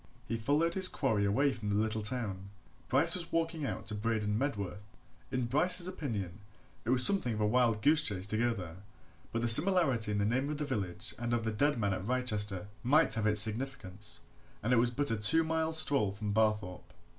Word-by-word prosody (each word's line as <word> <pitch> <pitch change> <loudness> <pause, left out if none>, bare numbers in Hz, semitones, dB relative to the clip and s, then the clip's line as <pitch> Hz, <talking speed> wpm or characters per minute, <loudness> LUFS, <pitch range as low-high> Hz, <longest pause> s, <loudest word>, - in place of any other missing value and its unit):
He 115 - -4
followed 145 +9 -1
his 190 0 +4
quarry 110 - -1
away 135 +8 +1
from 110 -4 -7
the 100 - -1
little 110 +1 -1
town: 105 -4 -5 0.4
Bryce 145 +6 +4
was 170 -2 0
walking 165 -3 -2
out - - -6
to 105 - -4
Braden 105 -1 -2
Medworth. 105 -6 -4 0.5
In 125 -1 -2
Bryce's 175 +8 +2
opinion, 110 - -6 0.5
it - - -4
was 125 -1 +7
something 160 - +3
of - - -6
a 105 - 0
wild 115 -1 0
goose 150 +1 +3
chase 95 -8 -1
to 110 - -2
go 120 +1 +1
there, 90 -6 -8 0.5
but 115 +1 -3
the - - 0
similarity 135 - +5
in 105 - -2
the 100 - 0
name 130 +6 -1
of 150 - -4
the 150 - -4
village 100 -6 -5
and 120 0 -2
of 115 - -3
the 110 - -2
dead 145 +6 0
man 100 -3 -1
at 95 - -5
Wrychester 105 -6 -3 0.2
might 150 +5 +2
have 110 -2 -2
its 105 -1 +5
significance, 110 -3 -2 0.4
and 120 +4 0
it - - +3
was 120 +1 +2
but 145 +3 -3
a 115 - -1
two 110 +11 +5
miles' 160 0 +4
stroll 140 -11 +4
from 100 +1 -5
Barthorpe. 105 -4 -2
115 Hz, 210 wpm, -30 LUFS, 105-145 Hz, 0.5 s, was